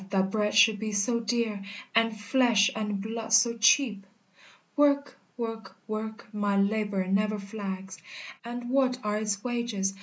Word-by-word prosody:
that 190 -1 +1
bread 210 0 0
should 215 0 +5
be 215 0 -3
so 210 +4 +1
dear, 225 -3 -1 0.3
And 225 -1 +2
flesh 225 -1 +3
and 210 -2 -2
blood 225 +2 -5
so 230 +1 +5
cheap! 220 -3 +3 0.7
"Work 285 -1 +2 0.2
work 225 -4 -5
work 220 +1 -5
My 205 -1 0
labor 200 -1 0
never 210 +3 +1
flags; 195 -2 -6 0.4
And 240 +1 -6
what 260 -2 +2
are 210 0 -1
its 210 -2 -2
wages? 235 -6 -2
215 Hz, 145 wpm, -28 LUFS, 200-235 Hz, 0.7 s, should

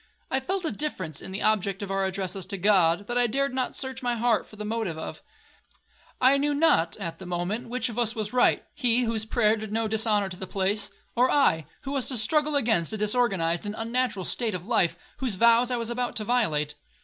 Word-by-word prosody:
I 265 - +2
felt 370 +7 -2
a - - -1
difference 190 - -4
in - - -7
the 195 - -3
object 200 -2 +2
of 195 - -5
our 195 0 0
addresses 190 -1 -3
to 195 - -4
God, 185 -1 +3
that 240 +3 -1
I 245 - +3
dared 275 +3 0
not 255 -1 -2
search 265 -1 -3
my 245 -1 0
heart 235 -1 +1
for - - -14
the 210 0 -6
motive 215 -6 -2
of. 160 - -7 1.0
I 265 +2 +5
knew 290 +1 +1
not, 230 - +3
at 170 -5 -5
the 190 - -9
moment, 180 +7 -3
which 250 0 -1
of 235 0 -5
us 235 0 0
was 215 0 -4
right,—he, 250 -1 +2
whose 225 -2 -1
prayer 220 -1 +2
did 215 -1 -7
no 225 +1 0
dishonour 215 -2 +1
to 185 - -8
the 190 - -6
place,—or 205 +6 -1
I, 160 - +3
who 270 - -6
was 275 -3 -1
to 255 - -1
struggle 300 +7 +2
against 220 - +2
a 215 - -3
disorganized 205 -5 0
and 205 - -4
unnatural 230 -4 -1
state 225 -5 -1
of 180 0 -6
life, 175 -7 +2 0.2
whose 255 -7 -2
vows 235 +4 +4
I 250 - 0
was 230 0 -3
about 245 0 -2
to 215 - +1
violate. 160 -11 +1
220 Hz, 220 wpm, -26 LUFS, 195-245 Hz, 1.0 s, I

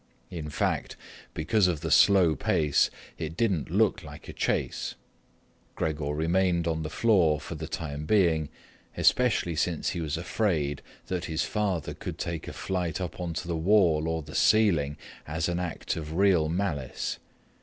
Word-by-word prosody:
In 80 -3 -5
fact, 75 - -1 0.4
because 90 +5 +2
of 85 -5 -1
the 80 - -3
slow 95 -6 +6
pace, 75 +1 +2 0.3
it 80 0 -5
didn't 95 - 0
look - - +2
like - - -11
a - - -7
chase. - - -1 0.8
Gregor 75 -2 -2
remained 85 +2 +1
on 80 -1 -1
the 75 - -4
floor 85 -6 +3
for - - -7
the - - -6
time 75 -1 -5
being, 85 -8 +3 0.5
especially 115 -9 +3
since 80 +1 0
he 85 - -3
was 80 -1 -2
afraid 80 -5 -1 0.2
that 90 -1 -3
his 80 -1 -1
father 100 -7 -1
could - - -7
take 85 -2 -4
a - - -6
flight 90 -4 -2
up 90 -3 -5
onto 85 -1 -4
the 85 - -1
wall 80 -3 +3
or 80 -1 -2
the 75 +1 -11
ceiling 85 -10 +3 0.3
as 80 +1 -1
an 90 0 -1
act 90 -3 -3
of 80 -1 -5
real 90 -4 +3
malice. 80 -7 -2
80 Hz, 160 wpm, -28 LUFS, 80-90 Hz, 0.8 s, slow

